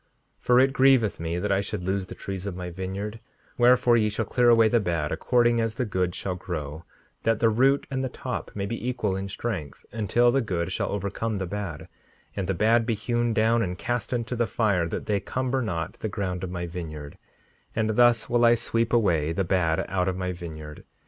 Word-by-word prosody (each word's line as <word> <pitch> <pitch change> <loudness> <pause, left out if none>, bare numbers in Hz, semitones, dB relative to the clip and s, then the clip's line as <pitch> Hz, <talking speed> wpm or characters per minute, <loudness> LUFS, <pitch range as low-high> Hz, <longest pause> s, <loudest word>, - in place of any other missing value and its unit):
5:66 - - -43 0.4
For 125 0 +5
it 135 +1 +4
grieveth 130 -6 +4
me 85 +1 -2
that 100 +3 -1
I 95 0 +3
should 100 -1 -4
lose 95 0 -1
the - - -8
trees 95 0 -6
of 95 - -4
my 90 -1 -5
vineyard; 95 +5 -5 0.4
wherefore 120 0 +5
ye 105 -1 +2
shall 110 +2 -2
clear 120 +3 +3
away 115 -1 +6
the 120 +1 +3
bad 85 -7 -1
according 120 -1 +2
as 115 -1 -1
the 125 - -1
good 90 -4 -1
shall 95 - -3
grow, 80 -3 -6 0.4
that 115 -1 +1
the 115 -1 +4
root 135 +5 +3
and 130 -1 -1
the 130 - -1
top 125 0 -5
may 100 -1 -2
be 115 +4 -3
equal 105 -6 -1
in 95 +1 -3
strength, 95 -8 -5
until 115 +3 +2
the 135 +2 +2
good 90 -5 -2
shall - - -1
overcome 100 +2 -2
the 95 - -2
bad, 90 -5 -5 0.5
and 95 -2 -2
the 95 - 0
bad 115 +5 +3
be 115 - +1
hewn 120 +2 0
down 115 +1 +3
and 90 -4 -2
cast 120 +6 -2
into 120 0 -2
the 120 -1 0
fire, 100 -7 +1
that - - -4
they 105 -2 +1
cumber 130 +5 -2
not 85 -7 -3
the 110 - -3
ground 95 -3 -3
of 95 - -3
my 90 -1 -4
vineyard; 80 -4 -7 0.6
and 110 0 +1
thus 120 0 +4
will 120 -1 +2
I 120 0 +6
sweep 115 0 -1
away 85 -9 +2
the 95 - 0
bad 85 -3 +1
out 90 0 0
of 95 -1 -1
my 90 -1 -2
vineyard. 80 -4 -8
105 Hz, 220 wpm, -26 LUFS, 90-120 Hz, 0.6 s, away